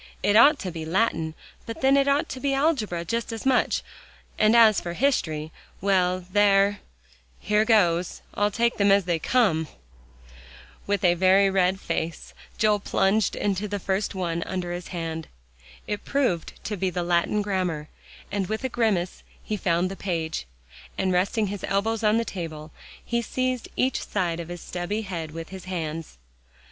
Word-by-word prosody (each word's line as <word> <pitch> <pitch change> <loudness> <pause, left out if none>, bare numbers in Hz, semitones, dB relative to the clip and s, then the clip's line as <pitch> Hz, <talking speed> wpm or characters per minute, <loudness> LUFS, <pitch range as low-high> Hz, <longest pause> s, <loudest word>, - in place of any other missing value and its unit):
"It 205 - +3
ought 285 +7 +7
to 185 - -4
be 165 -1 -6
Latin 160 -2 0 0.3
but 230 - -6
then 270 +1 +5
it 275 0 +3
ought 285 +4 +2
to 260 - -5
be 275 0 0
algebra 235 - 0
just 230 +6 -2
as 225 +2 -6
much, 260 -2 +2 0.6
and 215 +2 +5
as 225 -3 +6
for 175 - -5
history 160 - 0 0.3
well 185 -2 +1
there 200 0 +4 0.6
here 210 +1 +2
goes, 180 -6 +2
I'll 205 0 +1
take 235 +3 0
them 200 -1 +4
as 195 -2 +4
they 170 -2 0
come." 170 -7 +2 1.2
With 200 -1 0
a 175 - +6
very 190 +2 +4
red 190 0 +2
face 165 -4 -4 0.2
Joel 210 -1 +3
plunged 200 +1 +1
into 205 0 -1
the 205 0 -3
first 195 +1 -2
one 170 -2 -2
under 180 0 -3
his 175 0 -5
hand. 165 -2 -4 0.6
It 210 - -4
proved 250 - 0
to 210 - -3
be 190 -1 -1
the 180 0 -2
Latin 175 +4 +1
grammar, 180 -7 -2 0.4
and 200 -2 -1
with 220 +5 -3
a 260 - 0
grimace, 215 -7 0 0.2
he 215 - -2
found 180 -1 0
the - - -5
page, 165 - -3 0.5
and 190 -1 +1
resting 200 +5 +1
his 200 -1 -5
elbows 220 +3 0
on 215 +1 +4
the 230 - 0
table, 160 -6 -6 0.3
he 235 0 0
seized 255 +1 -2
each 260 0 0
side 175 -4 -1
of 170 - -5
his 175 -1 -7
stubby 185 +5 -3
head 170 -5 -5
with 165 +1 -8
his 190 -1 -9
hands. 165 - -5
195 Hz, 170 wpm, -25 LUFS, 175-220 Hz, 1.2 s, ought